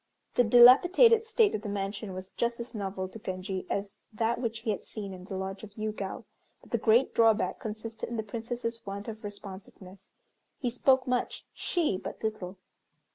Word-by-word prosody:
The 245 - +4
dilapidated 355 - +7
state 450 -2 +3
of 210 - -2
the 210 - -5
mansion 200 0 -4
was 185 0 -8
just 235 0 -1
as 235 +1 -7
novel 195 -3 -3
to 225 - -10
Genji 185 -1 -4
as 200 0 -3
that 225 +2 -1
which 230 -2 -3
he 225 -2 -1
had 200 - -4
seen 200 -3 -7
in 185 0 -10
the 190 -1 -5
lodge 190 +1 -5
of 205 -1 -11
Yûgao, 215 -3 -4 0.4
but - - -20
the 235 - +1
great 225 +5 +4
drawback 225 -1 +3
consisted 220 +1 -6
in 235 - -4
the 220 - -1
Princess's 230 +1 -4
want 200 +1 -6
of 220 -1 -7
responsiveness. 195 -2 -10 0.5
He 245 -3 -2
spoke 260 +2 +3
much, 250 -1 -2
she 310 - -1
but 195 +2 -8
little. 200 -4 -3
215 Hz, 185 wpm, -29 LUFS, 195-235 Hz, 0.5 s, dilapidated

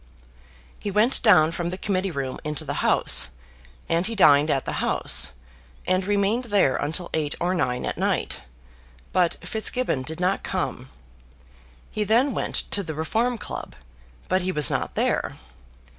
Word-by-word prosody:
He 205 - -4
went 215 +6 +2
down 180 -9 +5
from 170 0 -2
the 185 - -5
Committee 190 -1 -1
Room 135 -5 -4
into 150 -1 -2
the - - -3
House, - - +4 0.6
and 170 +3 +1
he 230 - -3
dined 150 -6 +5
at 135 -3 0
the - - -2
House, - - +1 0.6
and 185 +1 +1
remained 205 +4 +1
there 200 - +2
until 165 +4 -2
eight 150 -2 -1
or 175 +2 0
nine 125 -8 -1
at - - -4
night; - - -1 0.7
but 180 -2 +2
Fitzgibbon 220 - 0
did 155 +5 -5
not 185 +2 +1
come. 130 -8 -3 1.0
He 215 - -1
then 240 +6 +2
went - - -3 0.2
to 200 - +1
the 160 -5 -6
Reform 225 +10 0
Club, - - -7 0.5
but 185 +1 +1
he 185 +1 -1
was 150 -5 +3
not - - -2
there. - - 0
185 Hz, 160 wpm, -24 LUFS, 155-205 Hz, 1.0 s, down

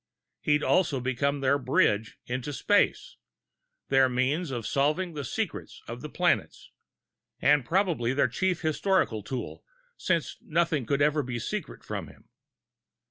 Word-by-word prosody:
He'd 150 0 +1
also 155 -7 +2
become 135 +3 -1
their 140 +1 +3
bridge 110 -4 +1
into 130 +4 -4
space, 205 - +1 0.7
their 135 -1 +5
means 135 +7 0
of 120 -4 -4
solving 155 +6 0
the 145 -2 -4
secrets 120 - -4
of - - -7
the - - -6
planets, - - 0 0.7
and 145 +1 +4
probably 165 -6 +1
their 130 -1 +2
chief 180 +7 -1
historical 160 - +1
tool, 125 +4 -6 0.3
since 170 -4 -1
nothing 155 -6 0
could 140 +2 +2
ever 150 0 +3
be 125 -3 -4
secret - - -5
from - - -5
him. - - -18
140 Hz, 135 wpm, -28 LUFS, 125-160 Hz, 0.7 s, their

